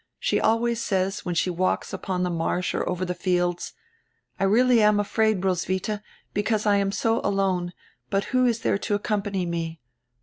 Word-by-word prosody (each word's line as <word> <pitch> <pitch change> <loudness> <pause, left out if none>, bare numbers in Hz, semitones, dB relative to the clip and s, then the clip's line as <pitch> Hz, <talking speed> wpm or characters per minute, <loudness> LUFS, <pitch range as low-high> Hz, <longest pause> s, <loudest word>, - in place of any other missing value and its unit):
She - - 0
always 235 +1 +2
says, 195 -2 -1
when 175 -1 -2
she 180 - +1
walks 185 +2 -1
upon 180 -1 -2
die 180 - 0
marsh 170 +2 -1
or - - -1
over 180 +1 -1
die 180 - -2
fields: 175 -1 -1 0.7
'I - - 0
am - - +3
really 245 +2 +5
afraid, 210 -1 +2
Roswitha, 190 +3 -1 0.3
because 215 +1 0
I 205 -1 +4
am 195 0 +1
so 225 +2 +1
alone; 190 -3 0 0.4
but 195 0 +1
who 255 0 +4
is 230 -1 0
there 200 - +1
to 205 - -1
accompany 205 -2 -1
me? 165 -1 -3
195 Hz, 175 wpm, -25 LUFS, 180-215 Hz, 0.7 s, really